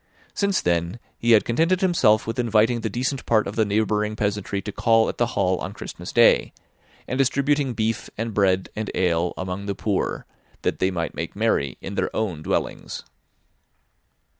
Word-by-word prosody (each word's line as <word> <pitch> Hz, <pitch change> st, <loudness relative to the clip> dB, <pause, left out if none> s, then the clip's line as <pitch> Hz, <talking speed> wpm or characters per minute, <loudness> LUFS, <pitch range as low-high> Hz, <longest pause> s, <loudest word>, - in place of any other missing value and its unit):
Since 200 Hz, -2 st, +1 dB
then, 85 Hz, +3 st, 0 dB, 0.2 s
he 120 Hz, 0 st, +4 dB
had 110 Hz, -, +5 dB
contented 165 Hz, -, +2 dB
himself 130 Hz, -, +3 dB
with 115 Hz, +3 st, -4 dB
inviting 115 Hz, 0 st, +2 dB
the 110 Hz, -, -2 dB
decent 130 Hz, +5 st, -2 dB
part 110 Hz, -2 st, +3 dB
of 100 Hz, -, -5 dB
the 110 Hz, -, +2 dB
neighbouring 105 Hz, +1 st, 0 dB
peasantry 100 Hz, -1 st, -2 dB
to 105 Hz, -, -4 dB
call 115 Hz, +2 st, +3 dB
at -, -, -6 dB
the 120 Hz, -, +3 dB
Hall 95 Hz, -2 st, +2 dB
on -, -, -5 dB
Christmas -, -, -7 dB
Day, -, -, +4 dB, 0.5 s
and 130 Hz, -, -2 dB
distributing 140 Hz, 0 st, +1 dB
beef, 110 Hz, 0 st, -1 dB
and 115 Hz, 0 st, -3 dB
bread, 95 Hz, -2 st, +2 dB
and 110 Hz, 0 st, -3 dB
ale, 90 Hz, -1 st, +1 dB
among 95 Hz, +2 st, -4 dB
the 100 Hz, -, -2 dB
poor, 100 Hz, 0 st, -2 dB, 0.4 s
that -, -, -1 dB
they 95 Hz, -, +2 dB
might 85 Hz, -3 st, -3 dB
make 85 Hz, -, -5 dB
merry 100 Hz, -, 0 dB
in -, -, -6 dB
their -, -, 0 dB
own 95 Hz, -8 st, -2 dB
dwellings. -, -, -3 dB
110 Hz, 175 wpm, -23 LUFS, 95-120 Hz, 0.5 s, had